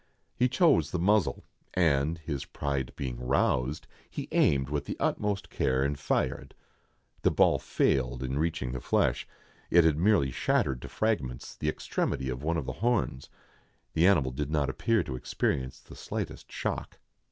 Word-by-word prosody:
He 125 +1 +2
chose 125 - +4
the 90 - -2
muzzle, 95 -2 +2 0.3
and, 80 -2 +2
his 75 -4 -4
pride 70 -3 -3
being 60 -3 -4
roused, 65 +2 +1 0.2
he - - -5
aimed 65 -2 +3
with 75 -1 -1
the - - -5
utmost 105 -2 -1
care, 65 0 +1
and 70 +1 0
fired. 65 -2 -1 0.7
The - - +4
ball - - +4
failed 65 -1 0
in 65 +2 -2
reaching 80 -6 -1
the 65 -1 -5
flesh; - - +1 0.4
it 85 0 +6
had 80 -2 +3
merely 90 -8 +3
shattered 65 0 0
to - - -7
fragments 85 - -2
the - - -1
extremity 65 -1 -2
of 65 0 -4
one 80 +3 0
of 75 - -2
the - - -3
horns. 115 - 0 0.6
The 85 +3 +4
animal 75 -10 +3
did 70 +3 -3
not 75 -2 +1
appear 115 -1 +1
to 65 - -5
experience 65 +1 -2
the - - -14
slightest - - -5
shock. - - -4
70 Hz, 165 wpm, -29 LUFS, 65-85 Hz, 0.7 s, it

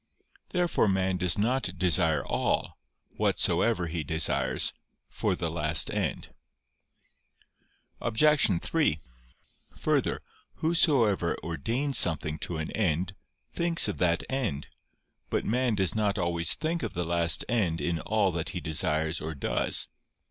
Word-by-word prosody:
Therefore 175 - +1
man 95 -1 0
does 90 -1 +1
not 125 +6 0
desire 80 -4 +3
all, - - -1 0.4
whatsoever 115 -7 +1
he 80 -1 -4
desires, 80 +2 +1 0.3
for - - -2
the 85 - -3
last 75 -1 +2
end. - - -3 1.7
Obj. 120 - +3
3: 150 - +1 0.8
Further, - - -1 0.3
whosoever 130 - +2
ordains 115 - +3
something 80 -1 +2
to 85 - -4
an 80 0 -4
end, 90 -2 -1 0.4
thinks 170 -5 +1
of 105 - -4
that 85 -1 +1
end. 120 - -3 0.6
But - - -1
man 125 0 0
does 95 -3 0
not 105 -2 0
always 85 -2 0
think 165 +2 -2
of - - -5
the 90 0 -2
last 85 0 0
end 95 -9 0
in 80 +3 -2
all 105 +1 0
that 85 -2 -3
he - - -5
desires 80 +1 -1
or 80 0 -5
does. 70 - 0
90 Hz, 125 wpm, -28 LUFS, 80-115 Hz, 1.7 s, desire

